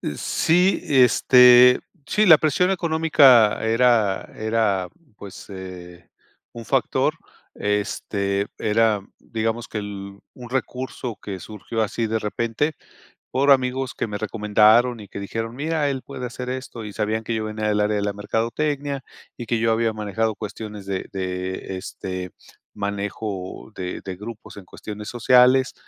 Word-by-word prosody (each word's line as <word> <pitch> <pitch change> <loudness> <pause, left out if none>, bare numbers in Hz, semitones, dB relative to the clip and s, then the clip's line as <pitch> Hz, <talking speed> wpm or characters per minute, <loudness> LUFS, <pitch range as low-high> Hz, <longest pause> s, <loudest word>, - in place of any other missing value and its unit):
Sí, 180 - +2
este, 125 -1 +6 0.3
sí, 215 - +2
la 160 -6 +8
presión 170 +5 +2
económica 155 - +4
era 110 -3 +2
era 110 -4 0 0.3
pues, 100 -2 -11
eh, 90 -2 -10 0.4
un 115 -1 -9
factor, - - +1 0.4
este, 100 -1 -2
era, 110 -1 +2 0.2
digamos, 115 +1 -3
que - - -6
el 100 -1 -7 0.2
un 125 -2 -11
recurso 125 -2 -4
que 95 -2 -6
surgió 110 +4 -4
así 110 +2 -2
de 110 +1 0
repente 115 +7 -1 0.6
por 140 +2 +1
amigos 130 -1 +2
que - - -2
me 105 -2 -5
recomendaron 110 +3 +3
y 105 - -10
que 100 - -8
dijeron: 115 +3 -5
"Mira, 150 +1 -1
él 135 -2 -4
puede 125 - -6
hacer 125 +1 -7
esto", 130 -3 -6
y 105 - -8
sabían 110 +1 -1
que 115 - -3
yo 110 -1 -2
venía 110 0 -3
del 105 0 +1
área 105 0 +1
de 100 - -1
la 100 0 -1
mercadotecnia 135 +7 -2 0.3
y 120 - -8
que 120 - +1
yo 115 0 +1
había 115 0 +1
manejado 110 +1 -2
cuestiones 105 -1 -7
de 95 -1 -4
de, 95 0 -4
este, 95 0 -6 0.5
manejo 100 -1 -5
de 90 -1 -5
de 95 -1 -5
grupos 110 +3 -10
en 100 - -10
cuestiones 105 +2 -9
sociales, 125 +2 +4
110 Hz, 145 wpm, -22 LUFS, 100-125 Hz, 0.6 s, la